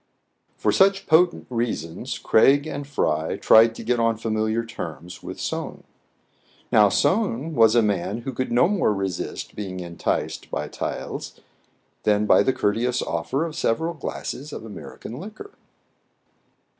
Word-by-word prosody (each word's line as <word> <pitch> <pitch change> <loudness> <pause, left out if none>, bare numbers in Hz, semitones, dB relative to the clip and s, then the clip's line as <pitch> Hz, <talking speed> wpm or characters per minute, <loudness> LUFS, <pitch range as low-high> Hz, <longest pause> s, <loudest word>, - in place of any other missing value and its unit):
For - - +1
such 195 0 +3
potent 170 +2 +3
reasons 115 -9 -3
Craig 140 +6 +4
and 145 -2 -5
Fry 80 - -1
tried 115 +1 +6
to - - -8
get 120 +1 +1
on 115 -1 +2
familiar 110 +1 -1
terms 90 -5 -8
with - - -8
Soun. - - -4 0.9
Now, 105 -1 +6
Soun 165 - +1
was 115 -4 +5
a 120 - +5
man 105 +2 -1
who 135 +2 -5
could 130 +1 -3
no 120 +5 +4
more 185 - +1
resist 95 -2 -4
being 95 -3 -5
enticed 85 -2 -3
by - - -3
taels - - -5 0.6
than 105 0 +2
by - - +6
the 115 - +2
courteous 120 +2 0
offer 85 - -1
of 160 -2 -6
several 165 +4 0
glasses 150 -1 -6
of 115 - -7
American 110 +3 -9
liquor. 220 - -9
115 Hz, 145 wpm, -24 LUFS, 105-145 Hz, 0.9 s, tried